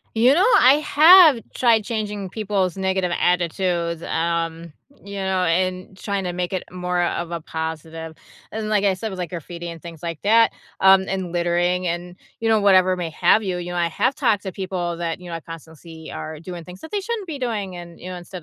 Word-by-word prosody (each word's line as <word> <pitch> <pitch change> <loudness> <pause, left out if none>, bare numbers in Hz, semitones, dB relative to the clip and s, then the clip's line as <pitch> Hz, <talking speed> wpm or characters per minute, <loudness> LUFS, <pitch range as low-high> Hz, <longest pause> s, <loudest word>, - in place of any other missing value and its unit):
You 245 +4 +5
know, 365 +7 +4
I 255 +2 +7
have 315 -3 +8 0.2
tried 230 -4 +3
changing 210 -3 -3
people's 200 -4 -1
negative 190 -2 -1
attitudes, 175 -1 0
um, 165 0 -2 0.3
you 200 0 -8
know, 190 -1 0
and 185 +2 -1
trying 200 -1 -3
to 175 - -3
make 180 0 -3
it 185 - -2
more 180 0 -2
of 170 0 -2
a 170 - -3
positive, 160 0 -6 0.4
and 220 -1 -4
like 210 -2 +1
I 200 -1 +3
said, 200 +4 -5
with, 190 - -7
like, 175 -2 -3
graffiti 170 +1 -7
and 165 -1 -9
things 170 -2 -11
like 165 -2 -5
that, 225 +3 +5 0.3
um, 190 0 +6
and 190 -2 -3
littering 175 +1 0
and, 175 +1 -4 0.2
you 225 - +1
know, 220 -1 +4
whatever 185 -2 +4
may 175 -2 -3
have 215 - +3
you, 185 -4 -2
you 175 0 -5
know, 175 - -4
I 170 -1 +2
have 170 - 0
talked 225 -8 +1
to 190 - -4
people 180 -2 -4
that, 170 0 -3
you 180 - -10
know, 170 - -4
I - - -9
constantly 160 -1 -11 0.3
see - - -8
are 155 -1 -7
doing 175 -1 -8
things 180 +1 -12
that 320 - -10
they 415 - 0
shouldn't 430 0 -4
be 310 -5 -6
doing, 210 -7 -3
and, 170 -1 -10
you 180 - -9
know, 180 - -6
instead 175 +1 -9
180 Hz, 220 wpm, -22 LUFS, 170-200 Hz, 0.4 s, have